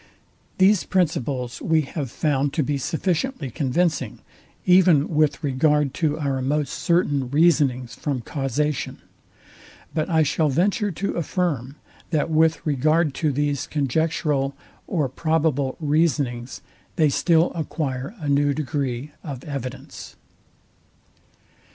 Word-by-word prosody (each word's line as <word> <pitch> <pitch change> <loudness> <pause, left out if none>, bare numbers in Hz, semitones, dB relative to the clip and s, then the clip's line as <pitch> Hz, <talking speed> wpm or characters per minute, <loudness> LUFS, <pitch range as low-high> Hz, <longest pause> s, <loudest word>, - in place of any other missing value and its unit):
These 190 0 +4
principles 140 -8 -1
we 160 -1 +2
have 140 -1 -5
found 145 0 0
to 155 - +1
be 140 +1 -1
sufficiently 170 - -2
convincing, 160 +4 0 0.5
even 180 -5 +5
with 150 0 +2
regard 145 0 +2
to 155 -2 +1
our 140 -3 -1
most 145 +1 -1
certain 145 -2 +1
reasonings 140 -5 +2
from 140 -4 -3
causation: 140 +3 -2 1.0
But 155 +1 -1
I 160 -2 +4
shall 155 +1 +1
venture 200 - +1
to 195 +2 -3
affirm, 155 - -2 0.3
that 160 0 0
with 160 +1 +2
regard 155 +1 +2
to 155 -3 +2
these 145 0 -1
conjectural 145 -1 0 0.3
or 155 -7 0
probable 145 -1 0
reasonings 145 -6 0 0.3
they 155 -2 +4
still 165 +3 +3
acquire 145 - -3
a 155 -6 -6
new 140 0 +2
degree 140 -1 -3
of 135 -5 -7
evidence. 135 -4 -7
150 Hz, 115 wpm, -23 LUFS, 135-160 Hz, 1.0 s, even